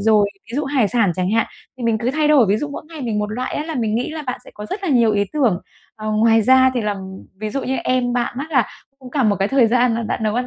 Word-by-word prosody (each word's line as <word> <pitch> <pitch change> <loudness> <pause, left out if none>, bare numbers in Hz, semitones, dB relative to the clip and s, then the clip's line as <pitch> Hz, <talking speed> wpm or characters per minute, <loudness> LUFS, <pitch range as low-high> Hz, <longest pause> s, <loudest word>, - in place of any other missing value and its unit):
rồi, 210 -1 +4 0.2
ví 245 - -4
dụ, 300 - 0
hải 270 -6 +1
sản 215 -7 +2
chẳng 185 +2 -1
hạn, 225 +1 +2 0.3
thì - - -7
mình 225 -1 +2
cứ 240 +3 0
thay 300 +2 +1
đổi, 285 -7 +5
ví 205 - +3
dụ, 295 +5 -3
mỗi 285 - -7
ngày 325 -2 -9
mình 225 -5 -2
một 210 - 0
loại 250 +3 -3
á 295 - -2
là 320 -1 -5
mình 225 -4 -1
nghĩ 240 +6 -1
là 310 -1 -5
bạn 250 -3 -4
sẽ - - -13
có 210 - -7
rất 395 - -5
là 380 - -2
nhiều 235 -6 +4
ý 200 0 +2
tưởng. 245 -12 +2 0.4
Ờ, 215 0 -4
ngoài 225 +1 +4
ra 260 +3 +5
thì 245 - 0
là, 210 -1 -1 0.4
ví 215 0 -3
dụ 275 +5 -3
như, 265 +1 -1
em 250 -1 0
bạn 245 -1 -1
á 280 - -3
là 260 -7 +2 0.3
cũng 255 -2 -12
cả 275 -1 0
một 205 -3 +3
cái 195 +2 +1
thời 270 -4 +4
gian 245 +1 +3
là 230 - -2
bạn 225 +1 -3
nấu 215 0 0
ăn 250 +1 -1
240 Hz, 310 wpm, -20 LUFS, 215-265 Hz, 0.4 s, đổi